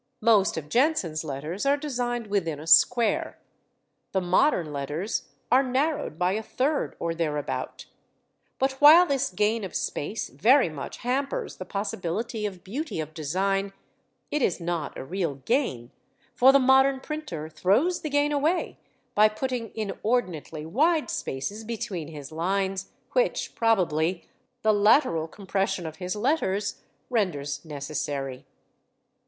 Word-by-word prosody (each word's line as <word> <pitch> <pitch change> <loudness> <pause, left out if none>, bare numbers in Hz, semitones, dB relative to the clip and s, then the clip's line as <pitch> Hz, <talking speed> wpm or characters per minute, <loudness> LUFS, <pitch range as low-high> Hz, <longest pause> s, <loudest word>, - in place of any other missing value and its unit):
Most 215 -6 +4
of 150 -2 -5
Jenson's 200 - +1
letters 155 +6 -4
are 280 +1 +3
designed 245 -5 -2
within 180 -8 -1
a 155 - -9
square, 225 +8 +4 0.8
the 190 - +2
modern 180 - +2
letters 145 +9 -3 0.2
are 255 +2 +6
narrowed 270 - -1
by 180 +1 +2
a 215 +3 -1
third 280 +6 -1
or 170 0 -1
thereabout; 150 -3 -3 0.7
but 265 +1 +1
while 320 +5 +9
this 275 -6 0
gain 210 +4 0
of 190 - -6
space 205 +10 -3
very 255 -3 +4
much 150 -3 -7
hampers 275 +3 -2
the 185 - -6
possibility 210 +3 -3
of 185 -3 -9
beauty 270 - -4
of 155 0 -5
design, 195 +6 -1 0.6
it 300 - 0
is 185 - +1
not 170 -4 -3
a - - -5
real 170 -2 -2
gain, 130 - -1 0.4
for 260 +2 +6
the 275 - +6
modern 265 0 +4
printer 270 - -5
throws 200 - +1
the 310 - -3
gain 290 +1 +2
away 300 +5 0 0.3
by 215 -1 +6
putting 235 0 -3
inordinately 195 -7 -2
wide 305 - +2
spaces 170 +12 -4
between 215 -8 -4
his 150 -3 -9
lines, 190 +3 -1 0.2
which, - - 0
probably, 180 -6 +1 0.4
the 215 0 +4
lateral 205 - +3
compression 195 0 -2
of 160 0 -6
his 180 0 -3
letters 210 -5 0 0.3
renders 155 - -1
necessary. 140 -3 -4
200 Hz, 135 wpm, -26 LUFS, 160-255 Hz, 0.8 s, while